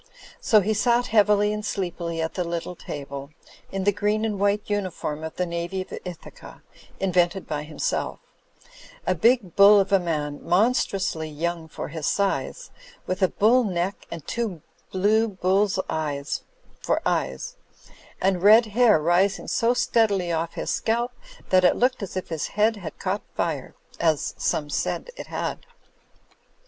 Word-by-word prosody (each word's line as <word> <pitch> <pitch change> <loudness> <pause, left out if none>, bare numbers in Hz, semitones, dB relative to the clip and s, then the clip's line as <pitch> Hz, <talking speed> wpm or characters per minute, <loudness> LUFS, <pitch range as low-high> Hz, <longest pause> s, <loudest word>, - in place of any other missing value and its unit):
So 215 -2 +4
he 215 +3 0
sat 240 +3 +2
heavily 210 -1 +4
and 210 0 -4
sleepily 170 -5 -3
at 160 - -3
the 180 - -1
little 170 +1 -4
table, 140 -3 -7 0.4
in 195 0 -2
the 205 - +4
green 210 +2 0
and 210 -3 -2
white 205 +1 +2
imiform 185 -7 -3
of 160 - -6
the 180 - 0
Navy 170 +2 -3
of - - -14
Ithaca 180 -2 -10 0.4
(invented 180 0 +1
by 150 -1 -2
himself); 155 0 -2 0.9
a 185 - +2
big 215 0 +2
bull 200 +1 +8
of 195 0 0
a 195 - +5
man, 150 -4 -2
monstrously 190 -4 +1
young 165 +2 -3
for 155 - -6
his 155 -1 -4
size, 200 - -1 0.3
with 185 +2 -3
a 185 - +5
bull 235 +7 +3
neck 185 -1 -2
and 165 -4 -7
two 215 -10 -3 0.3
blue 215 +4 +3
bull's 195 0 +1
eyes 145 -3 -2 0.4
for - - +1
eyes, 65 0 -1 0.6
and 190 -2 +1
red 215 +4 +7
hair 230 -6 +5
rising 175 +5 +2
so 235 +2 +2
steadily 220 -8 +2
off 165 0 -1
his - - -2
scalp 235 +2 0 0.4
that 185 -1 +5
it 180 - +5
looked 250 0 +1
as 190 -1 -5
if 185 - -4
his 160 -3 -2
head 220 +2 +4
had 175 -6 -8
caught 195 +2 -2
fire: - - -2 0.2
as 160 -3 +1
some 150 - 0
said 145 - -2
it - - -8
had. - - -4
190 Hz, 155 wpm, -24 LUFS, 170-210 Hz, 0.9 s, bull